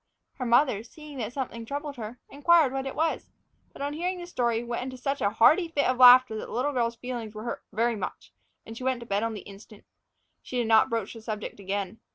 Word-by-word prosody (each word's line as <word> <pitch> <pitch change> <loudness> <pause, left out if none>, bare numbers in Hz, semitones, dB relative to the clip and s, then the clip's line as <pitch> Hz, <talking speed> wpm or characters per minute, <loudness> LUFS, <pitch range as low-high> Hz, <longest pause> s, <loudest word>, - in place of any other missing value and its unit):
Her 250 - -2
mother, 235 -3 +3
seeing 290 +4 -11
that 230 -1 -3
something 250 -3 -4
was 225 - -10
troubling 285 +2 -4
her, 225 +1 -7
inquired 295 -1 +3
what 270 0 -2
it 270 - -5
was; 320 +1 -1 0.4
but, - - -7
on 285 +1 -2
hearing 360 +4 -2
the 350 - -7
story, 240 -9 -1
went 235 0 -3
into 255 0 -6
such 275 +3 -2
a 200 - +3
hearty 300 - +4
fit 295 -4 0
of 255 - +1
laughter 250 -2 +8
that - - -6
the - - -11
little 270 +5 -1
girl's 235 -2 0
feelings 235 -3 -6
were 215 - -6
hurt 235 - -5
very 230 +2 +1
much, 200 - -6 0.3
and 225 - -9
she 255 - -8
went 260 -2 0
to - - -8
bed 200 -2 0
on 225 -1 -2
the 205 - -7
instant. 200 +1 -14 0.6
She 255 - -6
did 240 - +1
not 220 -1 +5
broach 225 -3 -2
the 225 - -10
subject 215 -2 -6
again. 200 +1 -4
240 Hz, 240 wpm, -27 LUFS, 225-275 Hz, 0.6 s, laughter